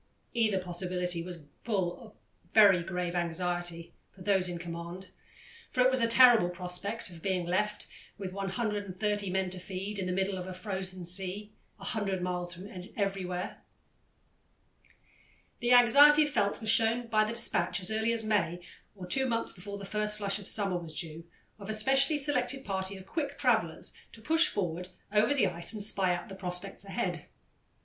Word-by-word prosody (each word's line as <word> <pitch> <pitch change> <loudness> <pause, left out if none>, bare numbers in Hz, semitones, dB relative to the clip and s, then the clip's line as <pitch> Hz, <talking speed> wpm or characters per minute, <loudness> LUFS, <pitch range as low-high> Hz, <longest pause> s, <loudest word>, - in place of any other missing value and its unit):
Either 220 -4 +2
possibility 180 -1 -2
was 170 -2 -8 0.2
full 195 -3 -1
of 220 -3 -14 0.4
very 200 -5 +7
grave 180 0 -3
anxiety 175 -1 -2 0.2
for 190 - -14
those 190 -2 +2
in 175 - -4
command, 170 +2 -7 0.6
for 255 - 0
it 255 +1 +5
was 260 -1 +1
a 230 - +3
terrible 230 -5 +7
prospect 180 +4 -4
of 165 -2 -11
being 185 -2 -1
left, 210 +4 -1 0.3
with 190 -2 -6
130 205 0 -2
men 190 0 -1
to 185 - -5
feed, 195 +3 -5
in 185 - -2
the - - -1
midst 190 +2 0
of 185 -1 -4
the 185 -1 -7
frozen 185 -1 -4
sea, 195 +4 -3 0.3
"a - - -12
hundred 200 -4 -1
miles 180 -1 -2
from 180 +3 -8 0.3
everywhere." 190 -3 -3 2.0
The 240 -1 0
anxiety 285 +5 +8
felt 235 -9 0
was 220 -1 +2
shown 230 +1 +2
by 215 -2 +3
the 215 +2 -2
despatch, 235 -3 +2
as 185 +2 -3
early 220 +1 +1
as 230 -1 +1
May, 195 -5 0 0.4
or 185 -3 -8
two 265 +9 +1
months 230 -1 -1
before 200 +2 -8
the 200 - -8
first 210 +1 0
flush 200 -1 -1
of 200 - -9
summer 195 -4 +2
was 160 -2 -5
due, 165 0 -5 0.3
of 200 0 -9
a 215 - +3
specially 270 +7 +3
selected 270 -2 0
party 190 0 -2
of 190 - -12
quick 305 +6 -3
travellers - - +1 0.2
to - - -10
push 325 +5 +4
forward 180 -2 -3 0.3
over 215 +3 +4
the 275 -7 +3
ice 170 +2 0
and 210 -2 -1
spy 190 -3 +3
out 175 - -7
the - - -9
prospects 185 +1 -5
ahead. 180 -4 -3
195 Hz, 175 wpm, -30 LUFS, 180-215 Hz, 2.0 s, anxiety